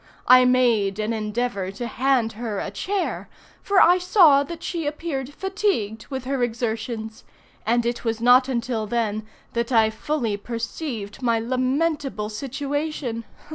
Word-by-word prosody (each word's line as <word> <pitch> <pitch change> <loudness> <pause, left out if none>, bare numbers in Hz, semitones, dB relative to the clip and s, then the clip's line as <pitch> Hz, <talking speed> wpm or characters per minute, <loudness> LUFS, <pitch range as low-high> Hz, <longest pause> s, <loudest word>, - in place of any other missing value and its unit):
I 255 0 +8
made 235 -6 +3
an 215 +1 -1
endeavor 215 -2 -2
to 240 +5 -5
hand 240 -1 +1
her 220 -1 -4
a 195 - -3
chair, 380 - -3 0.3
for 400 -1 +3
I 355 +1 +6
saw 350 -6 +6
that 330 +4 -6
she 335 -4 -3
appeared 290 -3 -3
fatigued 385 - -1
with 265 -2 -5
her 270 0 -1
exertions—and 230 0 -3
it 240 0 -2
was 225 -1 -1
not 250 +2 +5
until 235 -3 -2
then 215 -2 -1 0.3
that 235 +1 -1
I 220 -2 +4
fully 230 -2 -2
perceived 230 0 -5
my 235 -2 +2
lamentable 255 -2 -1
situation. 275 0 -3
240 Hz, 135 wpm, -23 LUFS, 220-280 Hz, 0.3 s, I